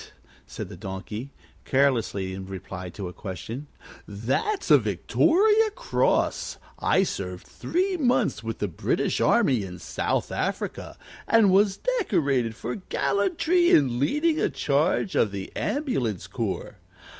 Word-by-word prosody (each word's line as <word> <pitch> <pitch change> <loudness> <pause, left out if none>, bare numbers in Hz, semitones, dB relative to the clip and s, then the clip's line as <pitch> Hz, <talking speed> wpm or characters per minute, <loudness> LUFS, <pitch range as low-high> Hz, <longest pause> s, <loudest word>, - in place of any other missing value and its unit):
said - - -6
the - - -10
Donkey, 100 +6 -6 0.3
carelessly, 115 -8 +1
in 95 0 -7
reply 95 -1 -7
to 95 +1 -6
a 90 - -8
question. 110 +9 -7 0.4
"That's 130 - -1
a - - +9
Victoria 425 +6 +3
Cross. - - 0 0.2
I 190 - +3
served 90 - -4
three 370 +2 -1
months 245 - +1
with 115 0 -4
the 105 - -1
British 85 - -1
army 125 -5 +3
in 90 -2 -7
South - - -2
Africa, - - -3 0.3
and 220 -4 +5
was 195 0 +4 0.2
decorated 140 - +1
for 120 +1 -4
gallantry 330 - +1
in 130 -5 +4
leading 305 - +1
a - - +2
charge 150 +7 +1
of 110 - +3
the 100 -1 -7
ambulance 135 - -1
corps. - - -4
135 Hz, 130 wpm, -26 LUFS, -, 0.4 s, a